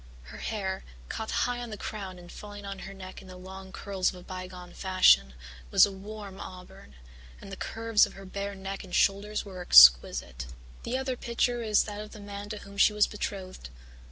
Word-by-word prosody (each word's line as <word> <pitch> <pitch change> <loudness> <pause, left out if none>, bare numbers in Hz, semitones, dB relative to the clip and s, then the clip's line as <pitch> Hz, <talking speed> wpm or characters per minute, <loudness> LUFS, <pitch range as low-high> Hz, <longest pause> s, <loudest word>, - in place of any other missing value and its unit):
Her 60 - -11
hair, 190 -3 -3 0.3
caught 220 - -4
high 245 0 0
on 240 -1 -6
the 215 - -6
crown 195 -4 -6
and 175 0 -12
falling 205 -1 -9
on 195 -1 -6
her 195 - -8
neck 185 -1 -9
in - - -14
the 185 0 -10
long 190 +1 -10
curls 195 -1 -1
of - - -8
a 180 - -11
bygone 185 -1 -8
fashion, 185 - +4 0.3
was - - +7
a 200 - -5
warm 200 0 -9
auburn, 180 - -11 0.4
and 195 - -11
the - - -5
curves 225 +2 +2
of - - -13
her 195 - -11
bare 200 +1 -5
neck 195 0 -6
and 185 -2 -6
shoulders 210 +2 +1
were 185 -2 -8
exquisite. - - +7 0.3
"The 255 - -2
other 260 -1 -2
picture 240 0 0
is 215 -2 +3
that 210 -1 -6
of 210 - -10
the 215 - -10
man 205 0 -7
to 215 - -4
whom 200 -1 -10
she 210 - +6
was 210 0 +4
betrothed. 190 - -6
195 Hz, 205 wpm, -29 LUFS, 185-210 Hz, 0.4 s, was